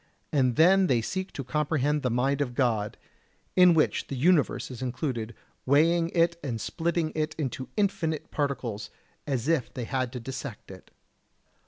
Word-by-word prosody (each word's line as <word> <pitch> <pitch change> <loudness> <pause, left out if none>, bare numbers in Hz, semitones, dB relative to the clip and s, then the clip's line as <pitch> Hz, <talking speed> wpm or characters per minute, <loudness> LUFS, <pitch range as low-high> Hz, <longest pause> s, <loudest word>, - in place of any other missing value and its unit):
And 130 -4 +2
then 185 +4 +5
they 125 -6 +3
seek 190 +6 -3
to 135 - -5
comprehend 150 +1 0
the 125 - 0
mind 135 +4 +1
of 125 -4 -2
God, 110 -6 0 0.6
in 180 -2 +7
which 155 - +1
the 140 - -4
universe 150 0 +2
is 125 -1 -8
included, 125 -3 -3 0.3
weighing 165 +5 +3
it 170 0 +2
and 120 -5 -3
splitting 165 +4 -1
it 155 0 -2
into 130 -3 -4
infinite 190 -7 -1
particles, 125 -8 -2 0.4
as 135 -3 -1
if 160 -7 +1
they 125 - -5
had 130 0 -2
to 125 - -4
dissect 130 -3 -7
it! 95 - -13
140 Hz, 160 wpm, -27 LUFS, 125-165 Hz, 0.6 s, in